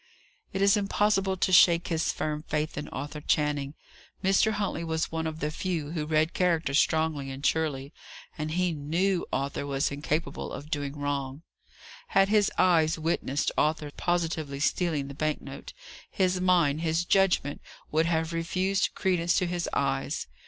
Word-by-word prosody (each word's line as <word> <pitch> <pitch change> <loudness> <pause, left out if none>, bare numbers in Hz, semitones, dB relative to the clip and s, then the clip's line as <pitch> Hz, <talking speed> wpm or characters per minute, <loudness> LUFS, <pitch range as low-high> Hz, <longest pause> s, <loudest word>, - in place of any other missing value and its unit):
It 195 - -3
was 200 +1 +5
impossible 200 -1 +1
to 185 - +1
shake 170 -1 +6
his 165 -2 +1
firm 150 -1 -3
faith 155 0 -2
in 150 - -5
Arthur 150 +1 -6
Channing. 145 -1 0 0.5
Mr. 195 +3 +3
Huntley 200 -5 -2
was 160 0 -2
one 160 0 -2
of 160 0 -6
the 150 - -1
few 160 -3 -3
who 155 -3 -3
read 155 +1 +2
character 170 -6 +1
strongly 155 -1 +1
and 135 +1 -6
surely, 150 -3 0 0.4
and 155 -1 -4
he 180 0 +1
knew 170 +5 0
Arthur 140 +1 -2
was 140 +1 0
incapable 145 +1 -3
of 150 +2 -8
doing 145 0 -3
wrong. 140 0 -3 0.6
Had 195 0 +3
his 210 -1 +3
eyes 165 -3 +3
witnessed 155 -3 -1
Arthur 150 -1 0
positively 165 -5 -1
stealing 155 -2 0
the 140 - -7
bank 155 +2 -1
note, 140 +1 -9 0.4
his 185 -1 0
mind, 170 -5 +3
his 165 +1 0
judgment 180 -7 +2 0.3
would 160 +2 +2
have 160 0 0
refused 185 +4 0
credence 175 -2 +1
to 185 - +2
his 175 0 -2
eyes. 135 +1 -1
160 Hz, 160 wpm, -28 LUFS, 145-180 Hz, 0.6 s, shake